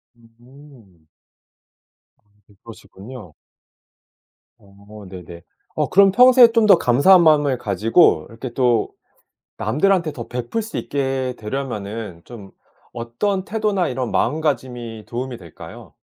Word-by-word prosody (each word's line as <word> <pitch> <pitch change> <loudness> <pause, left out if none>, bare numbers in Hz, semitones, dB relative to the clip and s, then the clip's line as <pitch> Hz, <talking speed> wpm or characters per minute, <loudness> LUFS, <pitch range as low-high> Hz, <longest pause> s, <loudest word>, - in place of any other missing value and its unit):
음. 120 - -21 1.1
어 105 0 -30
그러시군요. 105 - -13 1.2
어 100 +1 -16
네네. 90 -2 -11 0.3
어 - - -1
그럼 195 0 +5
평소에 250 +2 +6
좀 230 -1 +2
더 200 -4 +6
감사한 165 +7 +4
마음을 145 -4 +3
가지고 110 - +2
이렇게 115 +3 -8
또 120 -4 +1 0.7
남들한테 160 - 0
더 120 -5 -8
베풀 125 - -4
수 220 - -8
있게 135 -2 -3
되려면은 105 -5 -6
좀 105 -5 -12 0.4
어떤 120 - -3
태도나 210 -4 -1
이런 125 -1 -4
마음가짐이 125 -7 -3
도움이 125 +1 -6
될까요? 85 -3 -13
125 Hz, 240 characters per minute, -20 LUFS, 105-155 Hz, 1.2 s, 평소에